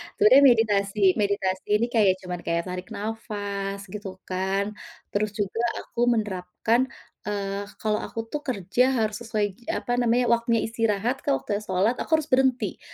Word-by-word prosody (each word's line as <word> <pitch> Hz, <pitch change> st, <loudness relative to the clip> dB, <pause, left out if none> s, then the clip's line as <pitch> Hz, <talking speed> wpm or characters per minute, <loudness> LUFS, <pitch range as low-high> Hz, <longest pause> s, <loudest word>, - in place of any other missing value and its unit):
Sebenarnya 260 Hz, +7 st, +7 dB
meditasi 210 Hz, -3 st, +1 dB, 0.2 s
meditasi 195 Hz, -2 st, 0 dB
ini 230 Hz, +3 st, +2 dB
kayak 210 Hz, -5 st, +4 dB
cuman 180 Hz, -1 st, -4 dB
kayak 170 Hz, 0 st, 0 dB
tarik 180 Hz, 0 st, -5 dB
nafas 205 Hz, -2 st, -4 dB
gitu 205 Hz, -1 st, -6 dB, 0.2 s
kan, 190 Hz, +2 st, -1 dB, 0.4 s
terus 210 Hz, +1 st, 0 dB
juga 205 Hz, +2 st, -2 dB, 0.2 s
aku -, -, -10 dB
menerapkan, 210 Hz, +3 st, 0 dB, 0.5 s
eee, 200 Hz, 0 st, -3 dB
kalau 215 Hz, -1 st, +1 dB
aku -, -, -7 dB
tuh 300 Hz, -, -2 dB
kerja 200 Hz, -1 st, +1 dB
harus 215 Hz, -2 st, 0 dB
sesuai 225 Hz, -2 st, -2 dB, 0.2 s
gi 240 Hz, -, -20 dB, 0.2 s
apa -, -, -5 dB
namanya, 245 Hz, +1 st, +3 dB
waktunya 235 Hz, -1 st, +2 dB
istirahat, 225 Hz, +1 st, 0 dB
kalau -, -, +2 dB
waktunya 205 Hz, +6 st, -1 dB
salat 190 Hz, +6 st, +2 dB
aku -, -, -5 dB
harus 315 Hz, -1 st, -2 dB
berhenti. 260 Hz, -1 st, +2 dB
210 Hz, 155 wpm, -25 LUFS, 195-230 Hz, 0.5 s, Sebenarnya